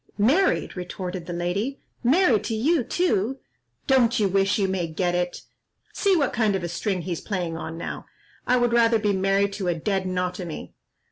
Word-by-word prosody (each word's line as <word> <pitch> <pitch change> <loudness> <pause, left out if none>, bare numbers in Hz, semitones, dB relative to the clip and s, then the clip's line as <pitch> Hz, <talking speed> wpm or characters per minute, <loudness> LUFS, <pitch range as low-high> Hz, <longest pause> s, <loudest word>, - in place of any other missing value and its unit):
"Married!" 290 - +2
retorted 180 -1 -5
the - - -4
lady, 185 +10 -2 0.2
"married 250 - +4
to 225 - -1
you 280 +6 +2
too! 260 - 0 0.5
Don't 255 -3 +3
you 205 - +3
wish 195 +1 +2
you 200 -2 +1
may 185 -3 -1
get 175 +2 -1
it? 175 0 -2 0.5
See 395 -2 +2
what 285 -6 +1
kind 215 -4 +2
of 190 - -2
a 175 - -3
string 185 +1 -2
he's 175 -2 -4
playing 180 -5 -3
on 165 0 -6
now. 170 - -6 0.4
I 250 - +4
would 240 -1 +2
rather 230 -1 +4
be 210 -1 +1
married 195 +1 +1
to 200 -2 -3
a 175 - +1
dead 190 +3 -1
notomy." 180 -2 -4
195 Hz, 185 wpm, -24 LUFS, 180-235 Hz, 0.5 s, married